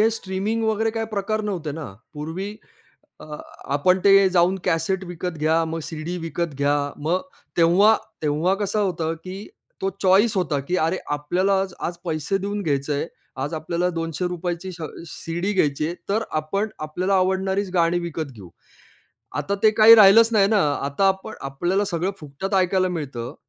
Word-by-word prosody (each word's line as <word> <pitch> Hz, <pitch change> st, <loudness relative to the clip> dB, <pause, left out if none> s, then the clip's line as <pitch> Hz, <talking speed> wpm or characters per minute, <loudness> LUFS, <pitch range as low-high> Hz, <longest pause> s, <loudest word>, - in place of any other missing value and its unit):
हे 220 Hz, -, +5 dB
स्ट्रीमिंग 210 Hz, +1 st, -2 dB
वगैरे 220 Hz, 0 st, +1 dB
काही 225 Hz, 0 st, -3 dB
प्रकार 215 Hz, +1 st, -1 dB
नव्हते 180 Hz, -8 st, -3 dB
ना. 160 Hz, +1 st, -6 dB, 0.3 s
पूर्वी 170 Hz, +8 st, -5 dB, 0.6 s
अ, -, -, -9 dB, 0.5 s
आपण 180 Hz, +6 st, +3 dB
ते 195 Hz, -1 st, +7 dB
जाऊन 180 Hz, +1 st, +3 dB
कॅसेट 180 Hz, +4 st, 0 dB
विकत 180 Hz, +1 st, -4 dB
घ्या, 160 Hz, +2 st, +2 dB
मग 165 Hz, 0 st, -4 dB
सीडी 165 Hz, +2 st, -5 dB
विकत 165 Hz, -1 st, -3 dB
घ्या, 145 Hz, +1 st, +2 dB, 0.3 s
मग 175 Hz, +4 st, +1 dB, 0.4 s
तेव्हा 180 Hz, +6 st, +6 dB, 0.3 s
तेव्हा 155 Hz, +5 st, +1 dB
कसं 205 Hz, +1 st, 0 dB
होतं, 170 Hz, -5 st, -1 dB
की 185 Hz, +4 st, -9 dB, 0.4 s
तो 195 Hz, -, 0 dB
चॉईस 195 Hz, +4 st, +4 dB
होता, 155 Hz, -6 st, 0 dB
की 175 Hz, +7 st, -2 dB
अरे, 180 Hz, +3 st, -1 dB, 0.2 s
आपल्याला 185 Hz, +6 st, +1 dB
आज 190 Hz, -2 st, -6 dB
आज 175 Hz, -, -7 dB
पैसे 160 Hz, +4 st, -1 dB
देऊन 205 Hz, +1 st, -3 dB
घ्यायचंय. 145 Hz, -2 st, -1 dB, 0.4 s
आज 145 Hz, +4 st, -3 dB
आपल्याला 170 Hz, +3 st, -1 dB
₹200 175 Hz, +1 st, -3 dB
ची 190 Hz, -1 st, -6 dB
श 170 Hz, -2 st, -9 dB
अ, -, -, -2 dB, 0.2 s
सीडी 175 Hz, +7 st, -3 dB
घ्यायची 150 Hz, -5 st, +1 dB
आहे, 170 Hz, -, -3 dB, 0.2 s
तर 220 Hz, +3 st, +1 dB, 0.2 s
आपण 195 Hz, +8 st, -2 dB
आपल्याला 180 Hz, +6 st, -1 dB
आवडणारीच 190 Hz, +1 st, 0 dB
गाणी 170 Hz, 0 st, +3 dB
विकत 160 Hz, -4 st, -5 dB
घेऊ. 100 Hz, -5 st, -12 dB, 0.9 s
आता 150 Hz, +7 st, -1 dB
ते 215 Hz, -, +8 dB
काही 225 Hz, +1 st, +11 dB
राहिलंच 220 Hz, +1 st, +8 dB
नाही 200 Hz, -3 st, +4 dB
ना. 210 Hz, -2 st, +3 dB, 0.2 s
आता 145 Hz, +8 st, +2 dB
आपण 190 Hz, +3 st, -2 dB
आपल्याला 175 Hz, +9 st, -1 dB
सगळं 180 Hz, -1 st, -1 dB
फुकटात 155 Hz, +7 st, -5 dB
ऐकायला 185 Hz, 0 st, +2 dB
मिळतं. 135 Hz, -9 st, -5 dB
180 Hz, 165 wpm, -23 LUFS, 160-195 Hz, 0.9 s, काही